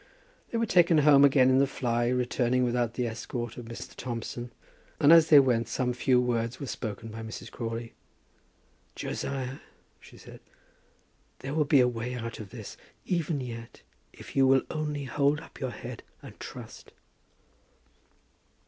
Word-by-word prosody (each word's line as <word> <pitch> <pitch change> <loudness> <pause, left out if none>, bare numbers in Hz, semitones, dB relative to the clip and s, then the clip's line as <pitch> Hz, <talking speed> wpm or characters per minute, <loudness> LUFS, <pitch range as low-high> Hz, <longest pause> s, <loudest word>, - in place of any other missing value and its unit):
They 235 - -2
were 230 - +1
taken 175 -5 +4
home 145 -2 +6
again 135 -2 +5
in 130 - +4
the 140 - +4
fly, 120 -3 -1
returning 125 0 +1
without 120 -1 0
the 125 - -1
escort 115 +1 -5
of 120 - -8
Mr. 115 0 -8
Thompson, 120 0 -5 0.5
and 145 +3 +7
as 165 -1 +7
they 150 - +9
went 120 -4 +2
some 125 +2 -1
few 125 +1 +2
words 120 -1 -1
were 140 - -4
spoken 115 -3 -5
by 110 +1 -7
Mrs. 110 0 -8
Crawley. 115 0 -5 1.0
"Josiah," 135 -1 -4 0.4
she - - -16
said, - - -13 1.0
"there 135 +2 -5
will 155 -1 +2
be 140 -2 +5
a 125 - +4
way 120 +1 -3
out 115 -1 -6
of 105 -3 -8
this, - - -9 0.3
even 165 -5 -1
yet, 115 -2 -8 0.3
if - - -13
you 135 -1 +5
will 135 0 +4
only 150 -2 -3
hold 140 +3 +1
up - - -14
your 130 - -2
head 120 -1 -8 0.2
and - - -12
trust." - - -10
125 Hz, 160 wpm, -28 LUFS, 115-140 Hz, 1.0 s, they